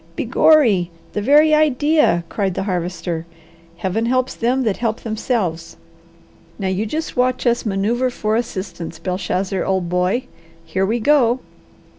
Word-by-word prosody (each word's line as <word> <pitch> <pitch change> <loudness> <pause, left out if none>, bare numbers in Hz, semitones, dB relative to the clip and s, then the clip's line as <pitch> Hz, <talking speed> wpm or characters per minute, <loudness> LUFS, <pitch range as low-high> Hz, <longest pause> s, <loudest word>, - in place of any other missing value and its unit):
"Begorry! 225 - +3 0.2
The 210 - -1
very 300 +7 +5
idea!" 300 - +3
cried 190 0 -2
the - - -2
Harvester. 175 -3 -3 0.5
"'Heaven 205 +6 -1
helps 255 +1 +1
them 255 +3 0
that 215 -5 0
help 225 -1 -2
themselves.' 215 -7 -2 0.8
Now 195 -2 -2
you 195 +4 -1
just 315 +8 -4
watch 255 +1 +1
us 240 -1 +1
manoeuvre 220 +6 0
for 215 -3 -1
assistance, 185 -7 -4
Belshazzar, 185 +2 -2
old 190 -3 -1
boy! 180 +7 +1 0.4
Here 190 +4 -1
we 230 +3 0
go!" 255 -1 +3
215 Hz, 135 wpm, -19 LUFS, 185-250 Hz, 0.8 s, very